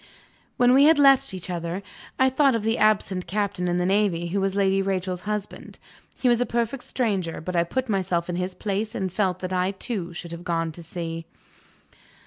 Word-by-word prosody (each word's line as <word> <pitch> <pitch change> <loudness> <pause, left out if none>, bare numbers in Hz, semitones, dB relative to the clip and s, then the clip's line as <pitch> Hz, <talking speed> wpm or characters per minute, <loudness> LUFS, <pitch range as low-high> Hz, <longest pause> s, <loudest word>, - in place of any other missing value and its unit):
When 245 -1 +5
we 275 +2 +7
had 315 0 +6
left 275 -1 +5
each 185 -2 -5
other, 175 +1 -4 0.3
I 260 0 +4
thought 270 -1 +3
of 225 - -2
the 225 +1 0
absent 200 -4 +2
Captain 200 -1 -1
in 175 0 +1
the 180 - +1
Navy 190 -3 +1
who 195 +3 0
was 195 0 0
Lady 195 -1 +2
Rachel's 185 -2 -2
husband. 210 -1 -5 0.4
He 255 - +1
was 240 -1 +4
a - - +2
perfect 235 +2 -2
stranger 195 -9 -1
but 180 +2 -5
I 170 - +4
put 260 +9 -2
myself 185 -5 0
in 175 - -3
his 180 0 -3
place, 210 +2 -3
and 190 -2 -2
felt 190 -3 0
that 185 0 -3
I 180 0 +1
too 195 -2 -3
should 170 0 -7
have 170 +1 -7
gone 165 -2 -1
to 170 - -11
sea. 165 -1 -6
190 Hz, 205 wpm, -25 LUFS, 175-220 Hz, 0.4 s, we